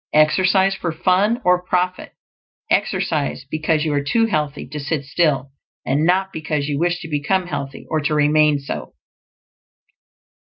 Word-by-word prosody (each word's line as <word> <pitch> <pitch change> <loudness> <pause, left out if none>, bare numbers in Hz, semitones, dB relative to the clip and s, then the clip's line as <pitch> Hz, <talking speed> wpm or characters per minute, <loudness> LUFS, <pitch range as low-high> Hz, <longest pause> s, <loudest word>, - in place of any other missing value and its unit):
Exercise 185 +5 +4
for 175 -3 -3
fun 185 +8 +2
or 180 0 +4
profit; 180 0 -1 0.6
exercise 75 +1 0
because 155 0 0
you 155 - 0
are 145 - +1
too 225 +11 +2
healthy 150 -9 -2
to 150 - -6
sit 150 0 -3
still, 140 -3 0 0.3
and 145 +5 +1
not 190 +2 +1
because 150 -2 -2
you 145 -1 -2
wish 175 +1 0
to 165 - -7
become 160 +5 0
healthy, 140 -6 -6
or 155 - 0
to 150 +1 0
remain 150 0 +4
so. 140 0 -7
155 Hz, 150 wpm, -20 LUFS, 145-180 Hz, 0.6 s, Exercise